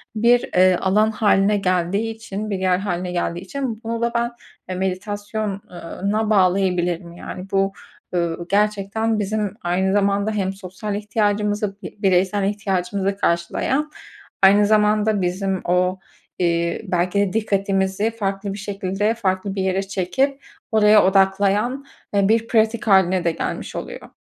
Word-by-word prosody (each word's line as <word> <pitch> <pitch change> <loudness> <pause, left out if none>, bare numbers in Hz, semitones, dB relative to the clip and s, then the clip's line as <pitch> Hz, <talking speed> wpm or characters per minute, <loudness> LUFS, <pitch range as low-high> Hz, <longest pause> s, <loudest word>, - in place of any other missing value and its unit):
bir, 235 +3 +3
eee, 185 0 +5
alan 210 +3 +3
hâline 205 -1 +3
geldiği 190 +3 0
için, 215 -1 -6
bir 195 -2 -2
yer 185 -1 +2
hâline 180 -2 -3
geldiği 175 -1 -2
için 230 +3 -5
bunu 230 +1 -3
da 235 0 +1
ben, 235 0 0 0.4
eee, 185 - -3
meditasyon, 205 +2 -3
ııı, 180 +3 -4
na 215 0 0
bağlayabilirim. 180 -3 +1
Yani 180 +2 -8
bu, 195 0 +2 0.4
ııı, 170 0 -1
gerçekten 210 +2 +1
bizim 210 -1 -2
aynı 185 +2 0
zamanda 200 +1 +1
hem 195 -3 -1
sosyal 195 +2 -6
ihtiyacımızı, 210 -1 -1
bi - - -8
bireysel 190 +1 +2
ihtiyacımızı 195 -1 -1
karşılayan 205 - 0 0.5
aynı 200 +2 +7
zamanda 210 -1 +3
bizim 190 +1 -1
o, 180 +1 +1 0.4
iii, 170 -1 0
belki 180 +2 +1
de 200 -1 +1
dikkatimizi 195 0 0
farklı 195 -2 -3
bir - - -7
şekilde 200 +1 -1
farklı 195 -3 -2
bir 195 - -1
yere 190 +1 0
çekip 265 +9 -1 0.3
oraya 215 -1 +6
odaklayan, 200 +7 +2 0.3
eee, 200 -1 +3
bir 230 +1 +2
pratik 225 0 +1
hâline 190 -2 +4
de 170 - +2
gelmiş - - -4
oluyor. - - -7
200 Hz, 140 wpm, -21 LUFS, 185-215 Hz, 0.5 s, aynı